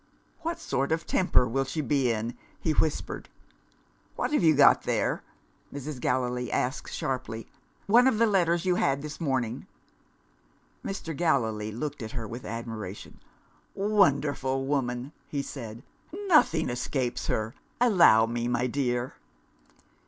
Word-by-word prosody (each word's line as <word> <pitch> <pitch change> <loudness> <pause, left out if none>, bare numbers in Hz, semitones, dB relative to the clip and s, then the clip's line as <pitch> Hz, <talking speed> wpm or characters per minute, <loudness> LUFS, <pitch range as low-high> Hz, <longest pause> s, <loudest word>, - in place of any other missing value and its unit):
"What 335 +1 -3
sort 140 - -1
of 160 0 0
temper 180 -9 +3
will 135 +4 0
she 135 +4 -4
be 140 -4 +1
in?" 115 +2 -3 0.2
he 160 - 0
whispered. 155 0 -1 0.9
"What - - -2
have - - +3
you 160 -3 +5
got 140 0 +6
there?" - - 0 0.5
Mrs. 140 -1 -6
Gallilee 125 0 -1
asked 130 +2 -1
sharply. 125 -4 -3 0.4
"One 240 +5 +6
of 260 - +3
the 230 - +5
letters 175 -5 +2
you 180 - +3
had 140 0 +1
this 150 +3 -7
morning?" 130 -6 -1 1.2
Mr. 180 -5 -4
Gallilee 115 -10 0
looked 140 +5 -5
at 110 -1 -6
her 115 -4 -4
with 120 +3 -7
admiration. 110 -4 -6 0.6
"Wonderful 140 -10 +2
woman!" 130 -1 -1 0.2
he 140 -1 -3
said. 115 -4 -8 0.4
"Nothing 170 - +4
escapes 125 0 -2
her! 110 +1 -1 0.3
Allow 175 - +6
me, 120 +1 -2
my 120 0 +1
dear." 125 -1 -1
135 Hz, 135 wpm, -28 LUFS, 120-160 Hz, 1.2 s, got